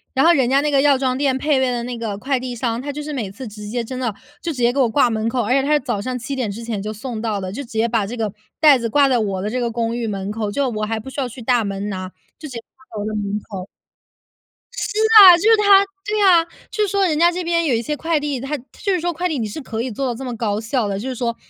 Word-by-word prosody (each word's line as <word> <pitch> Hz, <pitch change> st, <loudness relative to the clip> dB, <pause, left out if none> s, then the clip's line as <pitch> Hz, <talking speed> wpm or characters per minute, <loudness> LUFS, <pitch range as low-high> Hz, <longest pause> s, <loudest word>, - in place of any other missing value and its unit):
然 270 Hz, -, +3 dB
后 340 Hz, -, +7 dB
人 265 Hz, -6 st, +2 dB
家 270 Hz, +1 st, +4 dB
那 295 Hz, 0 st, 0 dB
个 275 Hz, -1 st, +4 dB
药 285 Hz, -1 st, +4 dB
妆 260 Hz, -1 st, 0 dB
店 270 Hz, -1 st, +1 dB
配 285 Hz, 0 st, +1 dB
备 260 Hz, -1 st, +1 dB
的 240 Hz, -1 st, -2 dB
那 245 Hz, 0 st, -4 dB
个 225 Hz, -4 st, -4 dB
快 265 Hz, +4 st, -1 dB
递 250 Hz, -1 st, -5 dB
箱， 235 Hz, 0 st, -2 dB
他 285 Hz, +2 st, -4 dB
就 295 Hz, +1 st, -6 dB
是 300 Hz, 0 st, -5 dB
每 230 Hz, -8 st, -3 dB
次 235 Hz, +6 st, -9 dB
直 210 Hz, -1 st, -9 dB
接 240 Hz, +2 st, -2 dB
真 255 Hz, +3 st, -6 dB
的 250 Hz, -2 st, 0 dB, 0.3 s
就 340 Hz, -, -2 dB
直 290 Hz, -, -7 dB
接 240 Hz, 0 st, +2 dB
给 280 Hz, -, -1 dB
我 250 Hz, -3 st, +3 dB
挂 250 Hz, +2 st, +3 dB
门 220 Hz, 0 st, -1 dB
口， 245 Hz, 0 st, 0 dB
而 210 Hz, -, -2 dB
且 270 Hz, +1 st, +4 dB
他 280 Hz, +2 st, -1 dB
是 300 Hz, -, +4 dB
早 240 Hz, -6 st, -2 dB
上 255 Hz, +3 st, -3 dB
7 250 Hz, +3 st, -5 dB
点 250 Hz, -5 st, -2 dB
之 215 Hz, +4 st, -6 dB
前 225 Hz, -3 st, -3 dB
就 210 Hz, +2 st, -4 dB
送 220 Hz, +1 st, -6 dB
到 220 Hz, -3 st, -1 dB
的， 185 Hz, -1 st, -5 dB
就 225 Hz, -, -5 dB
直 255 Hz, -, -11 dB
接 225 Hz, +1 st, +2 dB
把 225 Hz, -3 st, 0 dB
这 240 Hz, +4 st, -6 dB
个 215 Hz, -3 st, -2 dB, 0.3 s
袋 295 Hz, -4 st, +6 dB
子 230 Hz, -1 st, -2 dB
挂 285 Hz, +4 st, +4 dB
在 255 Hz, -3 st, +2 dB
我 200 Hz, -3 st, -1 dB
的 210 Hz, +2 st, -3 dB
这 255 Hz, -, -1 dB
个 240 Hz, -1 st, -1 dB
公 230 Hz, 0 st, -2 dB
寓 240 Hz, -1 st, -2 dB
门 200 Hz, -1 st, -4 dB
口， 215 Hz, -1 st, -3 dB
就 280 Hz, +5 st, 0 dB
我 215 Hz, -1 st, -3 dB
还 220 Hz, +1 st, -2 dB
不 265 Hz, +5 st, -9 dB
需 285 Hz, -, -6 dB
要 255 Hz, -, -2 dB
去 250 Hz, -, -11 dB
大 245 Hz, -1 st, +2 dB
门 200 Hz, 0 st, -4 dB
拿， 185 Hz, -2 st, -5 dB, 0.3 s
就 305 Hz, -, -7 dB
直 -, -, -10 dB
接 245 Hz, -3 st, -6 dB, 0.2 s
挂 260 Hz, -, -23 dB
到 -, -, -3 dB
我 -, -, -4 dB
的 215 Hz, -, -3 dB
门 205 Hz, 0 st, -2 dB
口。 185 Hz, -2 st, -5 dB, 1.1 s
是 460 Hz, -3 st, -3 dB, 0.2 s
啊， 365 Hz, -3 st, +10 dB
就 345 Hz, -, -5 dB
是 450 Hz, +1 st, +6 dB
它 400 Hz, -1 st, +6 dB, 0.2 s
对 425 Hz, 0 st, 0 dB
啊， 360 Hz, -4 st, +6 dB, 0.3 s
就 425 Hz, -, 0 dB
是 -, -, +1 dB
说 395 Hz, 0 st, +1 dB
人 315 Hz, -4 st, +1 dB
家 340 Hz, +2 st, +5 dB
这 360 Hz, +1 st, -4 dB
边 335 Hz, 0 st, +1 dB
有 280 Hz, -, +1 dB
一 225 Hz, -, 0 dB
些 300 Hz, +5 st, -3 dB
快 320 Hz, +1 st, 0 dB
递， 290 Hz, -3 st, -3 dB
它 275 Hz, +4 st, -3 dB
就 285 Hz, -, -4 dB
是 365 Hz, -, +1 dB
说 345 Hz, +1 st, -1 dB
快 350 Hz, +3 st, -1 dB
递 315 Hz, -5 st, -2 dB
你 220 Hz, -, -2 dB
是 220 Hz, +10 st, -6 dB
可 225 Hz, -4 st, -4 dB
以 255 Hz, -, -3 dB
做 270 Hz, +6 st, -3 dB
到 250 Hz, -, -1 dB
这 265 Hz, -, -7 dB
么 245 Hz, -2 st, -4 dB
高 215 Hz, -2 st, -1 dB
效 225 Hz, 0 st, -1 dB
的， 195 Hz, -1 st, -2 dB
就 235 Hz, -, -5 dB
是 260 Hz, -, -4 dB
说 235 Hz, -1 st, -2 dB
250 Hz, 345 characters per minute, -20 LUFS, 220-290 Hz, 1.1 s, 啊